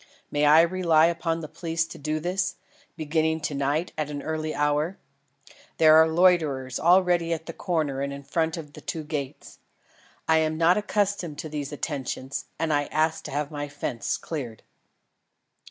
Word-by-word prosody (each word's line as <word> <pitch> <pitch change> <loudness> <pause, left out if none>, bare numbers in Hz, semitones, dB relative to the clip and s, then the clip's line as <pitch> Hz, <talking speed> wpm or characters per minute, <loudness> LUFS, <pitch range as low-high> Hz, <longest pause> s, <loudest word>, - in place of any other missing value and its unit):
May 145 0 +2
I 155 +2 +8
rely 170 -2 +3
upon 165 -1 -1
the 155 - -6
police 165 0 -2
to - - -11
do 155 +2 -2
this, 185 +3 -1 0.4
beginning 160 0 0
to 150 - -2
night 145 +5 -1
at 150 -1 -1
an 145 -1 -5
early 155 0 -3
hour? 150 +5 0 0.8
There 155 -1 +7
are 160 0 +7
loiterers 160 -7 +2
already 175 -1 +3
at 160 0 -5
the 165 - -7
corner 155 -8 -1
and 140 0 -2
in 140 0 -7
front 160 +3 -1
of 150 -3 -9
the - - -11
two 160 - -4
gates. 145 -3 -6 0.7
I 160 0 +4
am 155 0 0
not 170 +2 +4
accustomed 205 -6 -1
to 155 - -6
these 145 -1 -4
attentions, 135 -2 -4
and 160 -2 0
ask 155 +2 0
to - - -6
have 145 +1 -2
my 145 -1 -4
fence 140 -4 -3
cleared." 130 -9 -6
155 Hz, 170 wpm, -26 LUFS, 145-165 Hz, 0.8 s, I